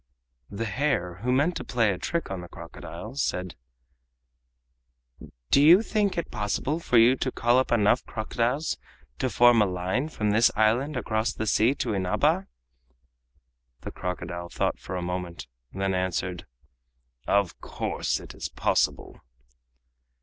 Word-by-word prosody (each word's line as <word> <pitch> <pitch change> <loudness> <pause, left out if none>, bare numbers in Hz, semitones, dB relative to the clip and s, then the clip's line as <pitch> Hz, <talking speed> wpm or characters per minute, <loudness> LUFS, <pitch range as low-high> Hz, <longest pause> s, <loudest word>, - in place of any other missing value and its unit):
The 110 +3 -4
hare, 110 -7 -1
who 125 +3 0
meant 145 +7 +2
to - - -5
play 115 -4 +1
a 90 - -4
trick 170 - -3
on 95 -2 -4
the 90 - -9
crocodile, - - -9
said: 90 -10 -2 2.0
"Do 140 - +6
you 170 +8 +7
think 210 -4 0
it 170 - -3
possible 105 +9 -1
for 125 -7 +1
you 120 +3 +6
to 130 - -1
call 120 +1 +3
up 130 - -1
enough 105 -3 +3
crocodiles 120 +6 -1 0.4
to 130 - 0
form 120 +1 +5
a 105 - +3
line 95 - -2
from 105 -8 -1
this 115 +3 +5
island 120 +7 +2
across 110 -1 -1
the 110 - -3
sea 110 +5 +3
to 115 -6 -2
Inaba?" 95 -2 +1 1.3
The - - -6
crocodile 85 -1 -5
thought - - -1
for 90 - -6
a 90 - -3
moment 90 -3 -4 0.3
and 95 - -9
then 95 0 0
answered: 90 -1 -2 0.8
"Of 100 -3 +1
course, - - -2
it - - -11
is - - -5
possible." - - -1
110 Hz, 150 wpm, -26 LUFS, 95-130 Hz, 2.0 s, you